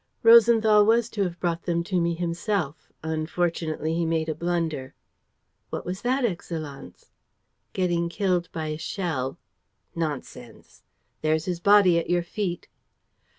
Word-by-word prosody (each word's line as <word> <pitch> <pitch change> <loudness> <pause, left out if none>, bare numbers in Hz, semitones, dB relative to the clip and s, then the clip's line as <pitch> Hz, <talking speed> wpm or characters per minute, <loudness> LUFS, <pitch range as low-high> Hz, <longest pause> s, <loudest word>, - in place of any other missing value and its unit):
"Rosenthal 225 -2 +7
was 230 +2 +3
to 210 - -3
have 175 -3 -2
brought 170 -2 -2
them 170 -1 0
to 180 0 0
me 170 0 0
himself. 170 -2 -3
Unfortunately, 160 0 -2
he 170 +1 0
made 160 -1 0
a - - 0
blunder." 160 -5 -2 0.7
"What - - -5
was 185 +2 -4
that, 255 +1 +1
Excellenz?" 160 -8 -6 0.6
"Getting 175 -2 0
killed 180 -1 -1
by 160 -1 -4
a 155 0 -4
shell." 160 -8 -3 0.6
"Nonsense!" 145 -7 -6 0.4
"There's 155 +1 +1
his 180 -3 -2
body 195 -3 +5
at 165 - -5
your 175 0 +2
feet." 175 -1 -4
170 Hz, 135 wpm, -25 LUFS, 160-190 Hz, 0.7 s, Rosenthal